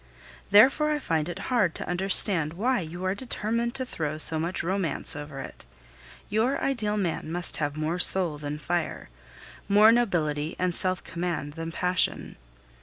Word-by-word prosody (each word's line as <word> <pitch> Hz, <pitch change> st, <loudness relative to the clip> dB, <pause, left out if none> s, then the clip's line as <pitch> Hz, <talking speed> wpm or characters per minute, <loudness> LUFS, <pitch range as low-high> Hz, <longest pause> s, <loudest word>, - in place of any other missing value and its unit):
Therefore 265 Hz, +9 st, +5 dB
I 300 Hz, -, 0 dB
find 165 Hz, -, -2 dB
it 175 Hz, -, -6 dB, 0.2 s
hard 200 Hz, -9 st, +1 dB
to -, -, -6 dB
understand 175 Hz, -3 st, +4 dB
why 245 Hz, +8 st, 0 dB
you 175 Hz, +2 st, -7 dB
are 185 Hz, -, 0 dB
determined 235 Hz, +1 st, -3 dB
to 260 Hz, -1 st, -2 dB
throw 155 Hz, -10 st, -4 dB
so 155 Hz, 0 st, +4 dB
much 170 Hz, +3 st, -3 dB
romance 185 Hz, -5 st, -2 dB
over 145 Hz, -1 st, -8 dB
it. -, -, -11 dB, 0.6 s
Your 225 Hz, +6 st, 0 dB
ideal 215 Hz, -6 st, -2 dB
man 170 Hz, -4 st, -3 dB
must 175 Hz, +1 st, +1 dB
have 145 Hz, -2 st, -3 dB
more 160 Hz, +3 st, -3 dB
soul 175 Hz, -6 st, +5 dB
than 145 Hz, 0 st, -5 dB
fire, 170 Hz, -, -4 dB, 0.6 s
more 210 Hz, +2 st, +6 dB
nobility 160 Hz, -10 st, -1 dB
and 180 Hz, -1 st, -1 dB
self 185 Hz, +1 st, 0 dB
command 170 Hz, -5 st, -5 dB
than 165 Hz, +1 st, -6 dB
passion. 180 Hz, +2 st, -1 dB
180 Hz, 160 wpm, -26 LUFS, 160-210 Hz, 0.6 s, more